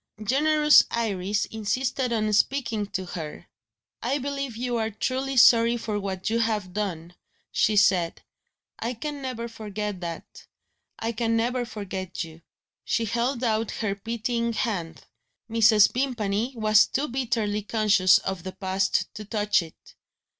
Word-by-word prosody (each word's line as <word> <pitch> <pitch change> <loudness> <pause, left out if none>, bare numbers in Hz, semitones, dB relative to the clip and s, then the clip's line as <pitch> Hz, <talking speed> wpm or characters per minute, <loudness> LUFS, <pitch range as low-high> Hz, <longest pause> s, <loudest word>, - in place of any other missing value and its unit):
Generous 300 +5 +5
Iris 205 -3 -1
insisted 250 +4 -2
on 215 -2 0
speaking 225 -2 +1
to 190 -2 -4
her. 165 -4 -7 0.6
"I 275 - 0
believe 275 -3 -4
you 245 0 -1
are 220 -1 0
truly 260 +5 -2
sorry 235 0 +6
for 215 -3 -3
what 190 -2 -4
you 230 +1 +1
have 215 -5 -1
done," 180 -5 -4 0.4
she 215 - +2
said; 185 -4 +2 0.6
"I 240 +2 -3
can 290 +4 -5
never 250 -3 -4
forget 210 -3 -5
that 170 -1 -8 0.5
I 225 - -2
can 230 0 0
never 245 +2 0
forget 190 -5 -5
You." 165 0 -12 0.4
She 230 - 0
held 235 +3 -1
out 225 -2 +1
her 215 -3 -2
pitying 235 +3 -2
hand. 185 -8 -3 0.4
Mrs. 220 -2 +5
Vimpany 235 -2 -1
was 215 -1 +4
too 285 +3 -1
bitterly 230 -5 -1
conscious 210 -3 +4
of 190 -2 -4
the 185 +2 -7
past 190 0 -1
to 210 - -7
touch 210 -2 +1
it. 160 -2 -14
220 Hz, 140 wpm, -26 LUFS, 200-240 Hz, 0.6 s, sorry